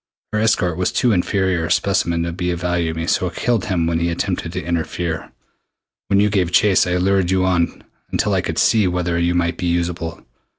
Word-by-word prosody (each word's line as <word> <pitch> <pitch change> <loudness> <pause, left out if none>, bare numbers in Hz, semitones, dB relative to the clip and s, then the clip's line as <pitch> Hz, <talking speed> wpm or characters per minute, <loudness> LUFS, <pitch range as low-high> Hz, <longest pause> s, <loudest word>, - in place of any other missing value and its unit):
Her 105 - +1
escort 95 -6 +1
was 90 - 0
too 125 - +2
inferior 95 -2 +1
a - - -4
specimen 85 -2 +1
to 85 - -2
be 90 0 -2
of 85 0 -3
value 90 -2 0
to 80 - -6
me 80 - -2
so 90 +1 +1
I - - -15
killed 120 -5 0
him 90 -5 0
when 85 0 0
he 85 0 0
attempted 85 - -2
to - - -4
interfere. 85 -1 -3 0.8
When 100 - +3
you 105 0 +3
gave 90 -4 +1
chase 95 0 +4
I 90 0 +1
lured 95 0 +1
you 95 0 +2
on 90 -2 0 0.3
until - - 0
I - - +2
could - - -4
see 110 -4 +3
whether 90 -1 -1
you 85 +1 +1
might 85 -1 0
be 90 - -2
usable. 85 -1 -2
90 Hz, 220 wpm, -20 LUFS, 85-95 Hz, 0.8 s, chase